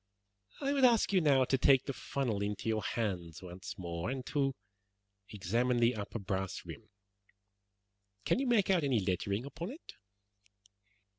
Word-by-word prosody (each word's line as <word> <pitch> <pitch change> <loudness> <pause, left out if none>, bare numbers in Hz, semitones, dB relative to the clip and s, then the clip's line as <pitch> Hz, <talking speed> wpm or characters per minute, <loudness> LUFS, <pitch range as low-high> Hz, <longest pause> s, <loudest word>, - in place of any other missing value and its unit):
"I 280 0 0
would 275 -2 +1
ask 235 -5 +5
you 185 - +5
now 140 -4 +4
to 135 +1 +1
take 135 -1 +5
the 140 - -3
funnel 125 -7 -2
into 105 +1 -3
your 110 -1 +1
hands 90 -9 -3
once 95 +2 -8
more 85 0 -4
and 130 -1 -4
to 135 -3 0 0.7
examine 115 +5 0
the 120 +1 +4
upper 105 +1 -5
brass 95 -2 -3
rim. - - -10 1.4
Can - - +2
you 270 - 0
make 215 -5 +3
out 180 -4 +3
any 135 -5 +2
lettering 100 +4 -1
upon 165 +6 -6
it?" 295 +8 -10
120 Hz, 155 wpm, -33 LUFS, 100-140 Hz, 1.4 s, ask